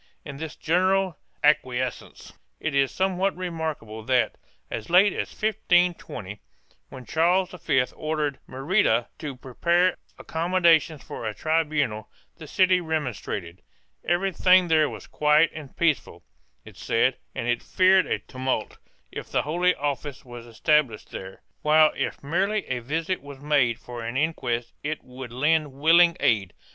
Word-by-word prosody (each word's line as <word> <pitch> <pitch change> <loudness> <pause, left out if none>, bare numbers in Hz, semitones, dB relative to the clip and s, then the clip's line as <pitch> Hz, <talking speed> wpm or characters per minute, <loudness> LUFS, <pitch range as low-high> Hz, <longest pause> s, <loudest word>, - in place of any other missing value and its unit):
In 140 -2 -7
this 160 +1 -6
general 185 +1 +1 0.2
acquiescence 130 -4 0 0.3
it 155 - -3
is 135 -1 +2
somewhat 190 0 0
remark 165 -6 -4
able 110 0 -9
that, 130 -1 +1 0.4
as 110 - -5
late 190 +4 +5
as - - -3
1520, 175 - 0 0.5
when 130 - -10
Charles 175 - +2
V 145 -7 +1
ordered 155 -2 -2
Merida 135 - +1
to 145 -4 -5
prepare 170 +8 +1 0.2
accommodations 165 -3 +2
for 115 - -6
a 105 - -4
tribunal, 150 -9 -1 0.3
the 155 - -11
city 185 +2 +3
remonstrated; 125 - -4 0.4
everything 180 0 +3
there 155 -2 +4
was - - -9
quiet 150 +2 +3
and 150 -4 -10
peaceable, 165 -4 0 0.4
it - - -14
said, - - +1 0.2
and 115 - -3
it 120 0 0
feared 185 0 +3
a - - 0
tumult 130 -4 -4 0.3
if - - -7
the - - +1
Holy 175 +4 +1
Office 145 -1 -4
was 120 -1 -10
established 120 0 0
there, 95 0 -9 0.2
while 155 0 +5
if - - -3
merely 195 +8 0
a 130 -1 -3
visit 160 +9 -2
was 140 -1 -10
made 140 -5 +2
for 120 -1 -8
an 115 +3 -3
inquest 125 -6 -1
it 155 +1 -4
would 125 -1 -9
lend 150 +3 +1
willing 170 +5 +5
aid. 100 -6 +1
150 Hz, 140 wpm, -25 LUFS, 130-175 Hz, 0.5 s, late